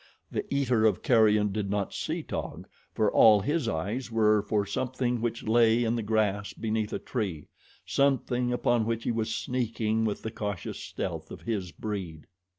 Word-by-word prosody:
The - - -4
eater 125 -5 +2
of 100 -4 0
carrion 105 -3 +4
did 100 -1 -2
not 100 -1 -1
see - - -3
Taug, - - -5 0.3
for 105 -2 +2
all 110 -2 +7
his 150 +10 -1
eyes 105 +11 -3
were 110 -2 +4
for 105 0 0
something 125 +2 -1
which 115 -1 -2
lay 115 +1 +4
in 115 0 +1
the 115 - -1
grass 105 -2 0
beneath 110 -1 -2
a - - -1
tree 95 - -4 0.4
something 125 -3 +1
upon 120 -2 +1
which 115 0 -1
he - - 0
was 110 -1 -1
sneaking 115 -3 -1
with 105 -2 -2
the 110 - -4
cautious 105 -5 -4
stealth - - -5
of - - -9
his 100 -6 -3
breed. 95 -8 -5
110 Hz, 170 wpm, -28 LUFS, 105-120 Hz, 0.4 s, all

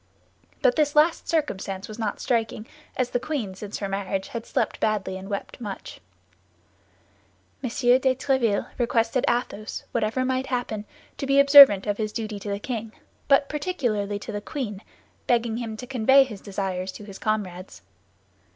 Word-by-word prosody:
But - - +4
this 295 -1 +2
last 315 +3 +3
circumstance 195 - -2
was 215 +1 -9
not 215 -3 -2
striking, 225 -3 -1 0.3
as 250 -1 0
the 245 - +1
queen 250 -7 -3
since 200 +2 -6
her 200 - -3
marriage 195 +1 -3
had 230 -4 -6
slept - - -1
badly 210 -3 0
and 190 +1 -8
wept 200 +4 -5
much. 205 -4 -7 1.6
M. 250 - -1
de 245 +1 +3 0.2
Tréville 255 -6 +1
requested 235 +1 +1
Athos, 230 -3 -2
whatever 235 +3 0
might 260 0 -1
happen, 240 -5 -3 0.3
to 275 - -3
be 275 0 +4
observant 280 -8 +9
of 205 -1 -1
his 215 -1 -1
duty 215 -2 -4
to 205 - -6
the 200 - -1
king, 225 0 -5 0.3
but 280 0 +4
particularly 245 - -2
to 210 - -7
the 205 -1 -4
queen, 210 -5 -5 0.5
begging 235 -2 +1
him 225 -2 -5
to 250 - -7
convey 265 +2 +5
his 215 -7 -9
desires 190 -2 -3
to 210 - -10
his 200 -2 -10
comrades. 195 -4 -3
225 Hz, 160 wpm, -25 LUFS, 205-260 Hz, 1.6 s, observant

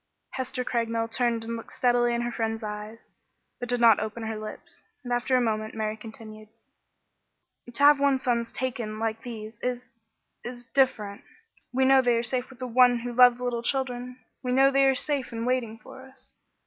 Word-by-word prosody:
Hester 260 0 -3
Craigmile 230 -2 -1
turned 235 -1 0
and 230 +1 -4
looked 225 - -9
steadily 240 -1 +2
in 235 - -1
her 240 0 -2
friend's 225 -1 -3
eyes, 210 +1 -7 0.5
but 245 - -5
did 245 0 +1
not 230 -3 +6
open 220 +1 -4
her 220 0 -3
lips, 215 0 -9 0.2
and 245 -1 -3
after 245 +2 +2
a - - +3
moment 215 -2 -2
Mary 215 -1 -2
continued: 220 -1 -11 1.2
"To 245 +4 -1
have 290 0 +7
one's 275 -2 +2
sons 235 -2 0
taken 235 -4 -4
like 225 0 -2
these 225 -2 -8
is 250 0 -4 0.5
is 245 0 -8
different. 230 -7 0 0.5
We 260 +1 +2
know 265 0 +6
they 245 -2 +2
are 230 - 0
safe 250 +1 -2
with 265 - -14
the 255 - -5
One 245 0 +5
who 245 0 -5
loved 245 0 +6
little 245 -1 -2
children; 250 0 -2 0.2
we 250 - -3
know 270 +1 +5
they 275 0 +4
are 270 - +3
safe 275 -1 -1
and 230 0 -4
waiting 245 -3 -1
for 260 +2 -13
us. 265 0 -20
240 Hz, 190 wpm, -26 LUFS, 225-255 Hz, 1.2 s, have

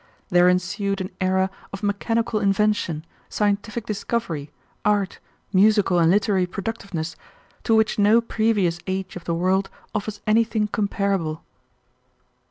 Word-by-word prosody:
There 180 0 +5
ensued 195 +2 0
an 185 0 -4
era 190 +1 +2 0.2
of 195 +1 -7
mechanical 220 +2 0
invention, 195 -5 +1 0.2
scientific 210 +2 -1
discovery, 195 -8 -3 0.3
art, 205 -2 +1 0.3
musical 195 -2 +4
and 165 -1 +4
literary 195 -1 +2
productiveness 190 -4 -4 0.5
to 225 - +4
which 220 -1 +2
no 210 +3 +6
previous 215 -7 +1
age 190 0 -3
of 180 - -8
the 170 - -1
world 190 +3 +1 0.2
offers 210 0 -3
anything 220 0 +2
comparable." 200 -6 -1
200 Hz, 120 wpm, -23 LUFS, 185-215 Hz, 0.5 s, no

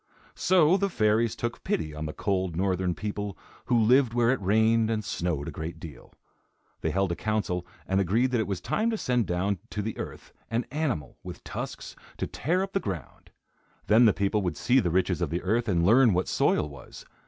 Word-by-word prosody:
So 180 -1 +4
the 200 0 0
fairies 110 - +2
took 120 0 -4
pity 80 -2 -2
on 75 +1 -5
the - - -4
cold, 95 -1 -1
northern 90 -1 0
people, 105 -3 -4 0.3
who 120 - +2
lived 120 +2 +4
where 120 0 +3
it 130 - -1
rained 110 +3 +3
and 110 -2 -1
snowed 85 -5 -2
a - - -4
great 80 +2 -6
deal. 80 -4 -11 0.7
They - - -1
held 95 -1 0
a - - -1
council 90 -3 -2 0.2
and 95 +1 +2
agreed 115 +8 +1
that 125 - +1
it 110 - -1
was 95 -3 -3
time 215 - 0
to 225 - -1
send 125 - 0
down 90 +3 -1
to 105 - -3
the 110 +1 -4
earth - - -8 0.2
an 115 +2 -1
animal, 140 - -2
with - - -9
tusks, - - -6 0.2
to - - -2
tear 180 +7 -1
up 195 - -6
the 195 - +2
ground. 90 - -7 0.6
Then 110 +3 +6
the 110 - +7
people 100 +2 0
would 90 -2 -2
see 125 +2 +3
the 90 - 0
riches 90 +3 +1
of - - 0
the 85 +2 -3
earth 115 +5 +1
and 85 -3 +2
learn 115 +2 +6
what 90 +1 0
soil 75 - +2
was. 70 -4 -12
105 Hz, 210 wpm, -27 LUFS, 90-120 Hz, 0.7 s, the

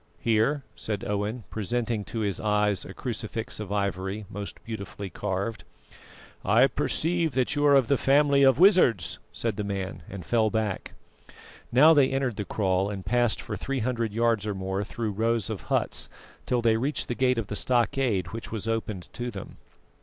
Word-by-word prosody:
"Here," 115 +6 +2
said 105 -2 -4
Owen, 105 +3 -2
presenting 115 0 -1
to 115 - -4
his 100 -4 -1
eyes 105 -2 +1
a 95 - -8
crucifix 115 -2 -4
of 105 -2 -6
ivory, 100 0 -2
most 100 0 -6
beautifully 100 -3 -6
carved. 100 +4 -3 0.8
"I 110 +7 +5
perceive 165 +2 0
that 130 +1 +1
you 145 - +1
are 140 - +6
of 135 -4 +4
the 140 - +2
family 140 0 +4
of 135 -2 +6
wizards," 175 - +4
said 115 -4 -2
the 105 - -1
man, 95 -3 -4
and 95 -3 -7
fell 110 +1 +2
back. 110 -3 -2 0.8
Now 150 +7 +7
they 140 -4 +5
entered 135 -4 -1
the 105 - -3
kraal 95 -1 0
and 100 -2 -6
passed 120 +2 +2
for - - -4
three 135 -2 -3
hundred 115 -2 -1
yards 115 -1 +1
or 105 - -2
more 95 +1 -2
through 110 +1 -3
rows 115 0 0
of - - -4
huts, - - 0 0.4
till 125 -1 +1
they 110 -1 +4
reached 140 +6 -1
the - - -1
gate 125 0 +2
of 115 - -1
the 105 - -5
stockade, 120 - +1
which 115 +2 -7
was 110 -1 -4
opened 110 -5 -2
to 120 0 -4
them. 100 -5 -8
110 Hz, 180 wpm, -27 LUFS, 100-125 Hz, 0.8 s, Now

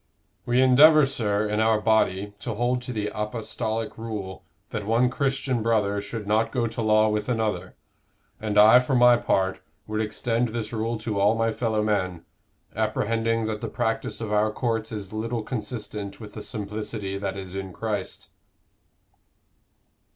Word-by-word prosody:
We 125 +2 +4
endeavor, 150 +4 +7
sir, 105 -6 0
in 105 0 -1
our 110 -1 +3
body, 105 -2 +1
to 115 0 -4
hold 120 +2 0
to 125 - -6
the 105 -3 -2
apostolic 110 +1 -3
rule 105 -5 -6 0.3
that 105 -1 -4
one 120 +3 +3
Christian 135 -2 -1
brother 105 -3 +1
should 105 +1 -6
not 110 +2 +1
go 120 -3 0
to 115 0 -3
law 110 0 +4
with 105 +1 -2
another; 110 -3 -1 0.6
and 105 -1 -2
I, 110 +4 +8
for 125 +1 -1
my 120 -1 +6
part, 95 -4 0 0.3
would 110 0 -2
extend 115 +3 -1
this 110 0 -4
rule 115 +1 -1
to 110 -2 -3
all 105 +3 +4
my 115 0 +1
fellow 110 -2 0
men, 95 -5 -1 0.5
apprehending 115 +1 0
that 110 -1 -3
the 115 - -3
practice 115 -2 -2
of 110 -2 -3
our 105 +1 +2
courts 115 -1 -2
is 105 -2 -6
little 115 +1 -2
consistent 105 -3 -5
with 105 -2 -10
the 105 - -7
simplicity 105 -2 -4
that 100 -1 -3
is 95 -1 -7
in 95 -1 -5
Christ." 105 -1 -4
110 Hz, 160 wpm, -25 LUFS, 105-115 Hz, 0.6 s, I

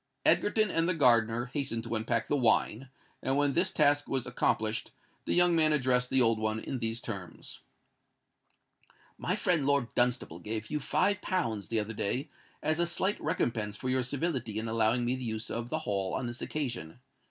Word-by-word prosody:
Egerton 210 -1 +3
and 165 +1 +1
the 185 - +2
gardener 120 -4 +4
hastened 125 -3 -2
to 115 0 -5
unpack 110 +1 -1
the - - +1
wine; 125 0 +1 0.3
and 135 +1 0
when 145 -1 +2
this 180 +5 +2
task 145 -3 +2
was 135 -3 -1
accomplished, 110 -2 0 0.4
the - - 0
young 175 -1 +5
man 155 -1 +4
addressed 125 -3 +2
the 130 -1 +4
old 115 -1 +3
one 110 0 -1
in 130 +3 -4
these 115 0 -2
terms:— 95 -9 -7 1.6
"My - - -1
friend 175 -5 +1
Lord 140 -3 +1
Dunstable 120 -9 0
gave 110 - -5
you 150 - 0
five 185 +8 +1
pounds 115 - -2
the 115 - 0
other 110 +1 -3
day 125 +7 -2 0.3
as 155 +1 +1
a 170 - +3
slight 190 +4 -1
recompense 105 -3 -1
for 130 - -4
your 130 0 +2
civility 130 -4 -2
in 110 +1 -3
allowing 115 +2 +2
me 125 +2 +1
the 130 - -6
use 110 -2 -4
of 120 +1 -4
the 155 - -1
Hall 95 -2 -1
on 130 - -2
this 120 +1 -6
occasion. 120 - -4
125 Hz, 185 wpm, -30 LUFS, 110-145 Hz, 1.6 s, young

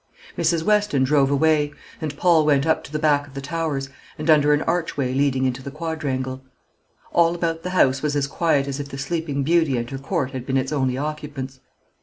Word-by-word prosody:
Mrs. 165 -1 +1
Weston 210 -9 +2
drove 135 0 +3
away; 150 +1 +2 0.3
and 150 -2 -4
Paul 170 -2 +4
went 145 -2 +3
up 160 0 +1
to - - -12
the 155 - -1
back 145 -2 +2
of 140 - -16
the - - -4
Towers, 150 -1 -2 0.3
and 155 +1 +2
under 150 -1 +5
an 150 +1 +2
archway 160 -7 -1
leading 135 -1 +1
into 130 0 -1
the 140 - -6
quadrangle. 140 -4 -3 0.7
All 170 0 +3
about 165 -1 -2
the 180 - -4
house 135 -7 +3
was 150 -1 -1
as 145 -1 +1
quiet 140 -1 +1
as 140 0 -4
if 140 -1 -5
the 135 - -7
Sleeping 145 -1 -2
Beauty 160 -3 +2
and 120 0 -2
her 135 - -5
court 135 -2 -2
had 130 -2 -5
been 135 +1 0
its 130 +1 -1
only 130 -3 0
occupants. 145 -3 -5
145 Hz, 210 wpm, -22 LUFS, 135-160 Hz, 0.7 s, under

